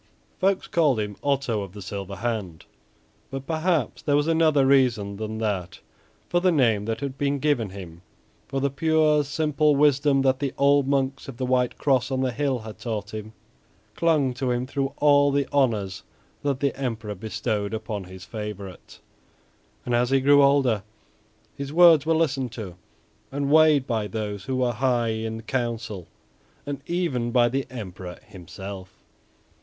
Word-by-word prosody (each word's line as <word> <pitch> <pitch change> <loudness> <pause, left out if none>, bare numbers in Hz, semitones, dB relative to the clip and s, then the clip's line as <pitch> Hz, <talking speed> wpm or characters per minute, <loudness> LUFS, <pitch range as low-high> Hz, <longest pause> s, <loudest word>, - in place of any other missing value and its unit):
Folks 195 0 +1
called 150 -8 +2
him 105 -1 -3
"Otto 140 -6 0
of 95 -2 -8
the 105 - -9
Silver 100 +1 -6
Hand," 100 -7 -4 0.6
but 135 0 -6
perhaps 160 -3 0
there 145 - +1
was 145 0 +2
another 160 -4 +3
reason 120 -7 +2
than 110 +1 -4
that 100 -5 -3 0.5
for 175 - +1
the 185 +1 +3
name 115 -9 +2
that 115 +3 -3
had 135 -1 -5
been 145 0 +1
given 140 -7 0
him, 90 -3 -10 0.5
for 135 - -2
the 140 0 0
pure, 155 0 +3
simple 150 +1 +1
wisdom 140 -1 +3
that 130 -1 +2
the 140 -2 -3
old 140 0 +4
monks 135 -1 -1
of 135 -3 -8
the 130 - -2
White 125 -1 +1
Cross 130 -3 +1
on 130 -1 -1
the 130 -1 0
hill 140 0 0
had 110 -2 -10
taught 110 -4 -4
him, 110 0 -7 0.6
clung 155 -6 +2
to 130 0 -2
him 125 0 0
through 135 0 -2
all 145 -1 +5
the 140 -1 0
honors 110 -9 0 0.4
that 140 -2 -1
the 140 -1 0
Emperor 115 -6 -4
bestowed 105 0 -3
upon 110 -3 -4
his 90 0 -11
favorite, 105 -4 -8 0.9
and 120 - -2
as 120 +1 +2
he 135 0 +3
grew 145 +2 +5
older 135 -6 +3 0.7
his 140 0 -6
words 165 -3 +6
were 165 - +3
listened 140 -6 0
to 105 -6 -7 0.6
and 140 +1 -2
weighed 155 -3 +5
by 110 -5 -1
those 105 -1 -5
who 130 - -2
were 125 -1 +1
high 120 -1 +1
in 110 0 -4
Council, 115 -6 -3 0.6
and 140 -1 -5
even 165 -9 -1
by 120 0 +4
the 135 +3 -2
Emperor 95 -7 -8
himself. 95 +1 -10
130 Hz, 165 wpm, -25 LUFS, 110-140 Hz, 0.9 s, words